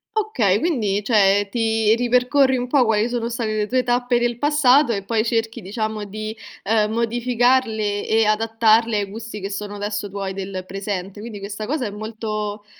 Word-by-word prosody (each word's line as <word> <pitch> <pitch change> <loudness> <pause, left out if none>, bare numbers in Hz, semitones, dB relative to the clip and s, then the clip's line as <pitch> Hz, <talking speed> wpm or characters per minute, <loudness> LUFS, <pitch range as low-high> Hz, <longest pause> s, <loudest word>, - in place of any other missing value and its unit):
Okay, 245 - +1
quindi 220 - 0
cioè 205 -2 +3
ti 225 -1 +2
ripercorri 250 +3 +2
un 250 0 -3
po' 265 0 +4
quali 220 -1 +2
sono 240 -1 -2
state 230 -2 -2
le 210 -1 0
tue 255 +3 +1
tappe 245 0 +1
del 240 -1 0
passato 290 -1 +4
e 200 -3 -2
poi 215 +2 0
cerchi 225 0 -1
diciamo 215 +2 -3
di, 215 +2 -6 0.3
uhm, 215 0 +2
modificarle 235 -2 +1
e 225 0 +2
adattarle 225 +1 +2
ai 205 - 0
gusti 215 +2 -8
che 195 0 -5
sono 205 +1 -5
adesso 205 0 -4
tuoi 195 -1 -4
del 190 -1 -5
presente. 195 0 -5
Quindi 220 -2 -7
questa 200 +2 -6
cosa 270 0 -2
è 205 - -4
molto 215 -1 -5
220 Hz, 175 wpm, -21 LUFS, 205-240 Hz, 0.3 s, po